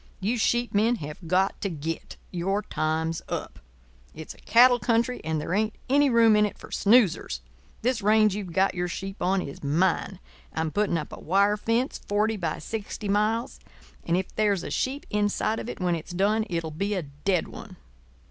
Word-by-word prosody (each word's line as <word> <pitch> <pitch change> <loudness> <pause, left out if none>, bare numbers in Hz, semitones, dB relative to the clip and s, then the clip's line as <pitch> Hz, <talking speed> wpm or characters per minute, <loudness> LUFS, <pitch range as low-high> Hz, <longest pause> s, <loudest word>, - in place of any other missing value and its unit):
You 225 +5 -1
sheep 240 +2 +1
men 220 +4 +3
have 150 -2 -8
got 185 +3 +1
to 200 - -1
git. 160 0 -5
Your 195 +4 -1
time's 160 +1 -1
up. - - -5 0.6
It's - - -8
a - - -21
cattle 245 +1 +5
country, 235 +3 +1
and 160 0 -1
there 155 - -3
ain't 215 +2 0 0.2
any 285 0 +5
room 230 -3 +5
in 210 - +4
it - - -10
for - - -12
snoozers. 200 - +3 0.4
This 245 -2 +1
range 215 0 +4
you've 200 -4 -5
got 190 +3 +2
your 180 0 -2
sheep 195 +3 -6
on 190 +1 +1
is 140 - -9
mine. 175 +5 +1 0.3
I'm 160 -1 -1
putting 205 -3 +1
up 155 - -6
a - - -8
wire 200 +4 +3
fence, 230 +5 -1
forty 210 +2 0
by 170 -6 -2
sixty 215 -1 -5
miles; 215 +4 0 0.4
and 170 +1 +1
if 185 - -3
there's 205 -4 +1
a - - -6
sheep 270 +2 -2
inside 210 +1 0
of - - -6
it - - -6
when 180 -1 +1
it's 165 +2 -5
done 210 +4 +1
it'll 165 -2 -2
be 200 +7 -2
a 185 - -2
dead 150 +6 -1
one. - - -11
200 Hz, 190 wpm, -26 LUFS, 170-220 Hz, 0.6 s, cattle